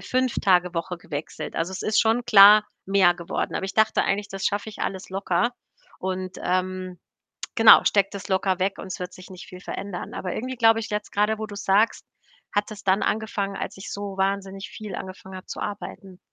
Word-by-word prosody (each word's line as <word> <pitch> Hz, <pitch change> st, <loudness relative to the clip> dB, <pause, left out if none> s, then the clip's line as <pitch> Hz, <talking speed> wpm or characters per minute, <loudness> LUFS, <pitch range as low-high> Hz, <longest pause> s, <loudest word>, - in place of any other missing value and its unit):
5- 255 Hz, -1 st, 0 dB
Tage-Woche 180 Hz, -2 st, +1 dB
gewechselt. 150 Hz, -3 st, -6 dB
Also, 165 Hz, +3 st, -1 dB
es 190 Hz, -, -5 dB
ist 215 Hz, 0 st, +2 dB
schon 230 Hz, +1 st, +2 dB
klar 210 Hz, 0 st, +8 dB, 0.2 s
mehr 190 Hz, -2 st, +5 dB
geworden. 170 Hz, -1 st, -4 dB
Aber -, -, -2 dB
ich 195 Hz, -, -7 dB
dachte 220 Hz, 0 st, +3 dB
eigentlich, 205 Hz, +1 st, -1 dB
das 195 Hz, 0 st, -3 dB
schaffe 210 Hz, +1 st, -2 dB
ich -, -, -13 dB
alles 190 Hz, -1 st, -4 dB
locker 190 Hz, +3 st, 0 dB, 0.5 s
und, 185 Hz, 0 st, -4 dB
ähm, 185 Hz, 0 st, -2 dB, 0.6 s
genau, 225 Hz, -1 st, +8 dB
stecke 195 Hz, -1 st, +3 dB
das 200 Hz, +1 st, -7 dB
locker 190 Hz, -1 st, +1 dB
weg 190 Hz, +1 st, 0 dB
und -, -, -7 dB
es 185 Hz, -, -5 dB
wird 180 Hz, 0 st, -6 dB
sich 185 Hz, -, -13 dB
nicht 185 Hz, -1 st, -10 dB
viel 180 Hz, -, -11 dB
verändern. 195 Hz, -1 st, -6 dB
Aber 180 Hz, -, -4 dB
irgendwie 255 Hz, +2 st, -4 dB
glaube 225 Hz, -1 st, +5 dB
ich, 225 Hz, -1 st, -6 dB
jetzt 210 Hz, 0 st, -3 dB
grade, 210 Hz, +1 st, +1 dB
wo 220 Hz, -, -4 dB
du's 205 Hz, 0 st, -8 dB
sagst, 205 Hz, +4 st, +2 dB, 0.5 s
hat 205 Hz, +2 st, 0 dB
das 210 Hz, -, -9 dB
dann 190 Hz, +1 st, +2 dB
angefangen, 205 Hz, -2 st, -1 dB
als -, -, -5 dB
ich 195 Hz, -, -8 dB
so 200 Hz, -1 st, -5 dB
wahnsinnig 195 Hz, 0 st, -2 dB
viel 215 Hz, -3 st, -8 dB
angefangen 190 Hz, 0 st, -8 dB
habe 185 Hz, -, -11 dB
zu -, -, -7 dB
arbeiten. 195 Hz, -2 st, -7 dB
195 Hz, 200 wpm, -24 LUFS, 185-210 Hz, 0.6 s, klar